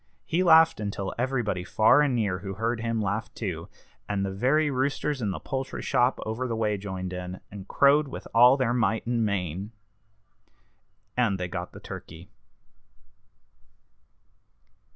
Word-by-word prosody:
He 175 +1 0
laughed 160 -5 +6
until 100 -2 -3
everybody 120 -8 -1
far 110 +8 +4
and 140 -4 +2
near 100 -6 0
who 95 +1 -6
heard 115 +3 -1
him 115 -1 -1
laughed 105 +3 -3
too, 85 -7 -5 0.4
and 100 -1 0
the 95 - -3
very 135 +9 +2
roosters 135 +1 -1
in 105 - -1
the 95 - -3
poultry 135 -1 -4
shop 125 +2 +2
over 110 +4 -3
the 115 - -2
way 110 -2 0
joined 95 -2 -5
in, 90 0 -6
and 100 -1 -9
crowed 145 +2 +4
with 135 - -8
all 125 +3 +7
their 125 -3 +1
might 110 -3 0
and 120 -1 0
main. 100 0 -2 1.4
And 115 -6 +1
they 90 - -2
got 90 -1 -5
the - - -11
turkey. 85 +5 -10
110 Hz, 150 wpm, -27 LUFS, 95-130 Hz, 1.4 s, all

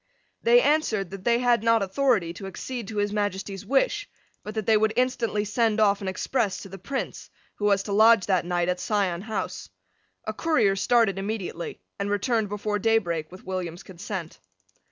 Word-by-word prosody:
They 485 +1 +5
answered 220 - +1
that 195 -1 -8
they 235 -1 +4
had 245 -2 +3
not 230 -2 +3
authority 195 -4 +1
to 195 +2 -8
accede 235 +3 -6
to 220 -1 -6
His 205 0 0
Majesty's 195 -2 -3
wish, 345 +10 +1 0.3
but 210 - -7
that 215 -2 -2
they 220 - +4
would 215 0 +2
instantly 230 -4 0
send 220 +1 +1
off 200 -2 +3
an 195 - -4
express 190 +2 -1
to 195 - -10
the 195 +1 -9
Prince, 270 +8 -5 0.3
who 205 - -2
was 200 -1 +3
to 205 - -6
lodge 220 -1 +6
that 185 -3 +2
night 175 0 0
at 180 0 0
Sion 195 -5 0
House. 220 +1 -4 0.6
A - - -3
courier 235 -12 +2
started 205 -2 +2
immediately, 195 -4 -4 0.2
and 200 0 -1
returned 210 +1 0
before 210 0 -2
daybreak 180 -8 0
with 185 - -13
William's 180 -2 -4
consent. 185 -2 -7
205 Hz, 180 wpm, -26 LUFS, 190-230 Hz, 0.6 s, lodge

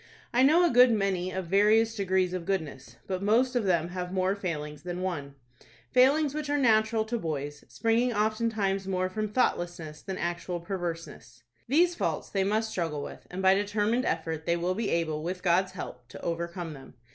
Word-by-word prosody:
I 245 - +4
know 320 +7 +6
a 340 - +2
good 250 +1 +7
many 195 -4 0
of 185 0 -4
various 210 +5 +4
degrees 190 -3 0
of 180 -2 -4
goodness; 155 -9 -3
but 185 -1 -3
most 240 +5 +2
of 240 -4 +1
them 170 -3 +1
have 180 0 -5
more 185 0 +1
failings 150 -6 -4
than 180 +1 -5
one,—failings 140 - 0
which 300 -1 -4
are 290 - +2
natural 220 -3 +3
to 235 +1 -2
boys, 145 -4 -4
springing 230 +2 +1
oftentimes 215 -3 0
more 185 -1 0
from 215 +2 -2
thoughtlessness 175 -9 -1
than 190 -1 -5
actual 175 +1 -3
perverseness. 165 - -6 0.2
These 340 +7 +4
faults - - -2
they 195 -1 +1
must 220 +3 0
struggle 160 -6 -2
with, - - -9
and 185 +2 -5
by 190 0 +6
determined 205 +4 0
effort 160 0 -2
they 170 0 +2
will 175 +2 0
be 215 +2 -2
able, 160 -2 0
with 180 +3 -4
God's 185 +1 +2
help, 125 -9 -8
to 145 +3 -11
overcome 170 0 -3
them. 135 -2 -13
185 Hz, 180 wpm, -28 LUFS, 170-220 Hz, 0.2 s, good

